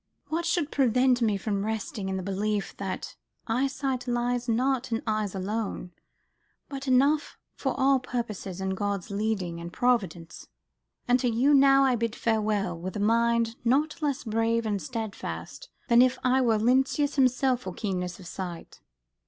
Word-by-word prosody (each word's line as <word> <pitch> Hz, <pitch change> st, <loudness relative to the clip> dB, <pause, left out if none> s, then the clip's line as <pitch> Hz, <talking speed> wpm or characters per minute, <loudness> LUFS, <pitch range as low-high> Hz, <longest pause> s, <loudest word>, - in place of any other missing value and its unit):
What 335 Hz, +2 st, -1 dB
should 335 Hz, -3 st, 0 dB
prevent 255 Hz, -1 st, +3 dB
me 215 Hz, -3 st, +2 dB
from 200 Hz, 0 st, -2 dB
resting 215 Hz, -2 st, -3 dB
in 190 Hz, -, -2 dB
the 190 Hz, -, -4 dB
belief 200 Hz, +2 st, -2 dB
that 195 Hz, -2 st, -5 dB, 0.3 s
eyesight 265 Hz, +1 st, -1 dB
lies 245 Hz, 0 st, -1 dB
not 255 Hz, +2 st, +1 dB
in 225 Hz, -, -1 dB
eyes 215 Hz, -2 st, -1 dB
alone, 195 Hz, -1 st, -3 dB, 0.8 s
but 275 Hz, -1 st, -7 dB
enough 280 Hz, +4 st, +2 dB, 0.2 s
for -, -, -3 dB
all 270 Hz, 0 st, +4 dB
purposes 215 Hz, -7 st, -5 dB
in 190 Hz, 0 st, -2 dB
God's 200 Hz, 0 st, -3 dB
leading 200 Hz, -5 st, -2 dB
and 170 Hz, 0 st, -7 dB
providence? 185 Hz, -8 st, -1 dB, 0.6 s
And 250 Hz, +1 st, +4 dB
to 245 Hz, -, +1 dB
you 250 Hz, +6 st, +3 dB
now 275 Hz, 0 st, +6 dB
I 260 Hz, -2 st, +3 dB
bid 230 Hz, 0 st, -2 dB
farewell, 215 Hz, -5 st, 0 dB
with 185 Hz, +2 st, -6 dB
a -, -, -2 dB
mind 230 Hz, +2 st, +2 dB
not 290 Hz, +7 st, +1 dB
less 290 Hz, -2 st, -1 dB
brave 225 Hz, 0 st, 0 dB
and 205 Hz, -3 st, -1 dB
steadfast 235 Hz, -, -6 dB, 0.2 s
than 235 Hz, -1 st, +6 dB
if 255 Hz, 0 st, +3 dB
I 255 Hz, +1 st, +3 dB
were 230 Hz, -3 st, +3 dB
Lynceus 265 Hz, +5 st, +2 dB
himself 255 Hz, -1 st, +2 dB
for 190 Hz, -, -5 dB
keenness 180 Hz, -4 st, -3 dB
of 185 Hz, -, -12 dB
sight." 175 Hz, -1 st, -7 dB
230 Hz, 160 wpm, -27 LUFS, 200-260 Hz, 0.8 s, now